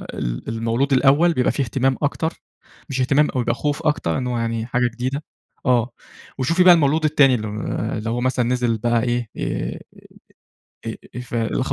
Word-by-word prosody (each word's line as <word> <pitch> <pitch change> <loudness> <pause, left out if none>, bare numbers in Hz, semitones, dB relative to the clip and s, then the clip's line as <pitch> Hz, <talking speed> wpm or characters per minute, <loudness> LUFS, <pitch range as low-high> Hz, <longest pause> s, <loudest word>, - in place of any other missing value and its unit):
ال - - -4
المولود 115 +5 0
الأول 145 +6 +4
بيبقى 125 -5 +2
في - - -2
اهتمام 130 +2 0
أكتر 160 +3 -2 0.5
مش 130 -1 -1
اهتمام 140 +4 +3
أوي، 125 - -1
بيبقى 120 0 0
خوف 145 +1 -2
أكتر، 150 - 0
إن 130 -2 -2
هو 125 -1 -1
يعني 115 -1 -2
حاجة 125 0 +1
جديدة، 130 +5 -3 0.4
آه، 125 -2 +2 0.5
وشوفي 165 +8 +3
بقى 180 -1 +9
المولود 155 -1 +2
التاني 145 -4 +4
الم 105 -2 -4 0.4
اللي 110 +1 -4
هو 120 +2 -1
مثلًا 130 -1 +1
نزِل 120 -2 0
بقى 115 +1 +1
إيه، 120 -2 -1
آآ، - - -3 1.1
إ - - -2
إ - - -7 0.2
إيه 125 - -5
فالاخ 120 +2 -2
125 Hz, 180 wpm, -21 LUFS, 115-140 Hz, 1.1 s, بقى